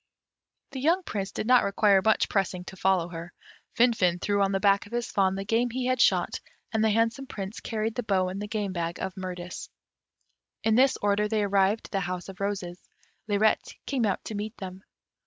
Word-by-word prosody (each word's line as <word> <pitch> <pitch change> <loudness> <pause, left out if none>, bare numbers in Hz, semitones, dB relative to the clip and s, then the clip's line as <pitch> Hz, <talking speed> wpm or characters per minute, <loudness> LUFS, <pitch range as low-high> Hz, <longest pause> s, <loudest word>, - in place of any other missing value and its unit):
The 270 - -5
young 335 +7 +2
Prince 200 - -4
did - - -4
not 250 +1 +5
require 200 -1 +4
much 220 0 +3
pressing 185 -2 -1
to 190 - -9
follow 185 -2 +1
her. 170 0 -7 0.5
Finfin 210 -8 +3
threw 200 +1 0
on 195 0 +2
the 195 - +1
back 200 0 +3
of - - -17
his 240 -1 -2
fawn 190 -1 +2
the 195 0 -4
game 230 +4 +1
he 250 +2 -3
had 255 -1 +1
shot, - - +3 0.3
and 220 -1 +1
the 220 - +4
handsome 230 +5 +1
Prince 195 -1 -6
carried 220 0 -2
the 245 - -2
bow 195 -5 +1
and 190 +2 -5
the 210 - -4
game 205 -3 -2
bag 170 -1 -3
of 190 -1 -3
Mirtis. 180 -1 -6 0.9
In 220 0 +3
this 260 +4 +4
order 205 +1 +2
they 215 -1 0
arrived 200 +2 +2
at - - -12
the 195 - 0
House 180 0 -4
of 190 - -10
Roses. 190 -3 -3 0.5
Lirette 210 +1 +1
came 255 -6 0
out 195 - -1
to - - -5
meet 210 +2 -5
them. 190 -1 -8
205 Hz, 210 wpm, -27 LUFS, 190-225 Hz, 0.9 s, not